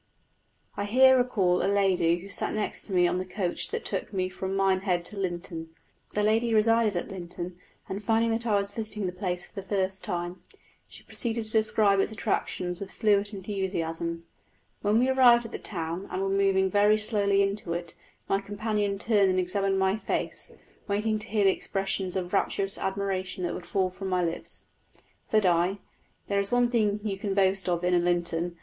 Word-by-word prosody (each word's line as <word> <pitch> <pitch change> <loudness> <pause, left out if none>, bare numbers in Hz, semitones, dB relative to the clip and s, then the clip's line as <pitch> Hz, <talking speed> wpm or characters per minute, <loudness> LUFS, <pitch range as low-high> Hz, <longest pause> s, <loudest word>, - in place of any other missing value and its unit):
I 200 - -2
here 260 +5 +6
recall 205 -8 +2
a 195 - +2
lady 185 -4 +3
who 195 - -11
sat 200 - -3
next 215 -1 -3
to - - -9
me 180 -2 +4
on 180 - 0
the - - -2
coach 185 -1 -2
that 460 0 -4
took - - -2
me 185 -2 -1
from 190 +1 -4
Minehead 190 -2 +1
to 210 - -1
Lynton. 175 -4 -5 0.4
The 210 - +1
lady 225 +2 +2
resided 225 -1 +3
at 175 - -3
Lynton, 175 -1 -7 0.3
and 200 +2 -5
finding 225 +2 +2
that 230 +1 -1
I 210 - +3
was 200 0 0
visiting 215 -1 -4
the 180 - -1
place 180 -1 -2
for - - -19
the 195 - -5
first 190 -1 -1
time, 175 -2 -4 0.5
she - - -13
proceeded 230 -1 -2
to 215 - +5
describe 215 -2 +3
its 195 - +1
attractions 185 -4 -2
with 200 - -6
fluent 205 -2 +1
enthusiasm. 170 -4 -3 0.6
When 210 +1 +2
we 250 +2 +3
arrived 245 -3 +5
at 230 - -8
the - - -5
town, 170 0 -3
and 190 - -2
were 195 - 0
moving 195 -1 +2
very 205 +2 +4
slowly 200 -2 +2
into 195 -3 -2
it, 170 -1 -5 0.3
my 195 - +1
companion 205 0 -2
turned 205 -2 +3
and 185 - +1
examined 195 +2 0
my 190 +2 +2
face, - - -3 0.4
waiting 215 +2 0
to 210 - -6
hear 215 -2 +1
the 195 - +6
expressions 195 -1 -2
of 180 -1 -3
rapturous 195 0 +2
admiration 190 -1 -2
that 175 - -1
would 175 - -7
fall 190 -2 0
from 190 +1 -6
my 180 -1 +1
lips. 170 0 -4 0.6
Said 215 -2 +2
I, 175 +2 +2 0.5
"There 200 0 0
is 200 0 0
one 245 0 +3
thing 210 -3 +1
you 200 -3 -3
can 200 -1 -2
boast 190 -1 +2
of 175 0 0
in 180 -1 +2
Lynton. 175 -1 -1
195 Hz, 195 wpm, -27 LUFS, 180-210 Hz, 0.6 s, here